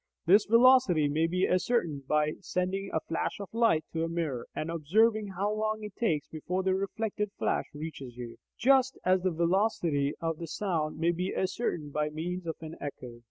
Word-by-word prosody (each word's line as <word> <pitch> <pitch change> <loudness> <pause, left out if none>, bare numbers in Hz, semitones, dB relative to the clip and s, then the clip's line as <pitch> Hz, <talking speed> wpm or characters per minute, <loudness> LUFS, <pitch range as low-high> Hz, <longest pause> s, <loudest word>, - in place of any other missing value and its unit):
This 195 +5 +5
velocity 230 - +5
may 155 +3 +1
be 180 +2 +1
ascertained 175 - 0
by 150 0 +2
sending 190 +2 -2
a 160 - 0
flash 165 - -3
of 200 - -6
light 225 -10 +3
to 165 0 -1
a 165 - -1
mirror, 160 -8 -3
and 160 +2 -3
observing 210 +7 +2
how 205 +2 0
long 215 0 -2
it 210 -2 -8
takes 160 -11 0
before 180 +4 -3
the 190 0 +2
reflected 210 +2 -2
flash - - 0
reaches 145 -5 -7
you, 120 -1 -7 0.2
just 265 +1 +3
as 185 0 +3
the 185 - +1
velocity 170 -4 +1
of 165 -1 -2
sound 160 -7 -2
may 165 +2 +2
be 180 +2 -3
ascertained 175 -7 -2
by 150 0 0
means 170 +3 -4
of 160 - -2
an 160 0 -8
echo. 125 -4 -7
175 Hz, 180 wpm, -29 LUFS, 155-205 Hz, 0.2 s, This